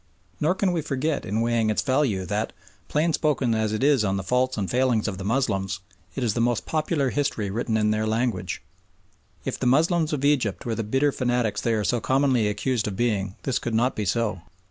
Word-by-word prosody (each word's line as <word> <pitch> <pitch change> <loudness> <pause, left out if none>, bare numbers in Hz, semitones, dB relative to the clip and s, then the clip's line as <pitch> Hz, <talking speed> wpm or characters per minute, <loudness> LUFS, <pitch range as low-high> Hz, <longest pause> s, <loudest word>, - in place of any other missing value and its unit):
Nor 160 +5 +2
can 190 -1 +1
we 170 -2 0
forget 145 +1 -2
in 105 +3 0
weighing 115 -1 +1
its 110 - +1
value 130 -9 +1
that, 105 +3 -2 0.3
plain 155 +2 +1
spoken 140 -7 +1
as 110 -1 0
it 110 +4 -1
is 140 -5 +4
on 100 -1 0
the 95 - -3
faults 125 +5 +1
and 100 -3 -1
failings 125 -2 +1
of 95 -3 -4
the - - -5
Moslems, 100 -5 0 0.4
it 135 - -2
is 115 -4 +1
the 115 - 0
most 120 0 +1
popular 155 -4 0
history 125 -9 -1
written 110 +1 -1
in 105 -1 +2
their 110 0 0
language. 110 -5 -1 0.8
If - - -3
the 130 - 0
Moslems 160 +4 +3
of 140 -2 -1
Egypt 130 -9 +1
were 115 - -1
the 115 - -2
bitter 135 +7 +2
fanatics 125 -4 0
they 115 -1 +1
are 105 - 0
so 120 +2 0
commonly 130 -4 +2
accused 105 +2 -1
of 100 - -3
being 100 -4 0
this 135 -1 0
could 120 -2 -3
not 120 +4 +2
be 105 - -2
so. 105 -2 0
120 Hz, 215 wpm, -25 LUFS, 105-135 Hz, 0.8 s, is